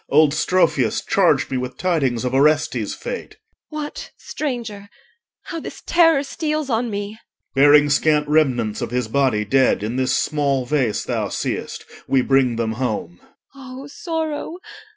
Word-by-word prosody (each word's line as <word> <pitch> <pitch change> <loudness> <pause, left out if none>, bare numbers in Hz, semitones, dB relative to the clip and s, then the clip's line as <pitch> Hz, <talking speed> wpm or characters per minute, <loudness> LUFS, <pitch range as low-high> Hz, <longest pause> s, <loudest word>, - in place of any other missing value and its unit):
Old 150 0 +4
Strophius 155 - +1
Charged - - +2
me 130 - 0
with 125 0 -5
tidings 135 -10 0
of 125 - -2
Orestes' 145 -5 +2
fate. - - -6 0.4
EL. 305 0 -4
What, 295 - -7
stranger? 230 -8 -5 0.5
How 335 - -6
this - - -9
terror 330 -4 +4
steals 305 -1 -3
on 230 +1 0
me! 205 +1 -5 0.4
OR. 135 - +2
Bearing 145 +1 +7
scant 150 0 +2
remnants 130 -8 +1
of - - -3
his 125 -1 -1
body 115 -4 +1
dead 130 -2 +2
In 115 +4 -3
this 130 0 +1
small 140 -4 0
vase 130 -6 0
thou - - -2
seest, - - -4 0.2
we 135 -2 +2
bring 135 -3 +2
them 115 -1 -1
home. 105 -8 -3 0.4
EL. 260 -1 -9
O - - -9
sorrow! 320 +1 -4
150 Hz, 155 wpm, -21 LUFS, -, 0.5 s, Bearing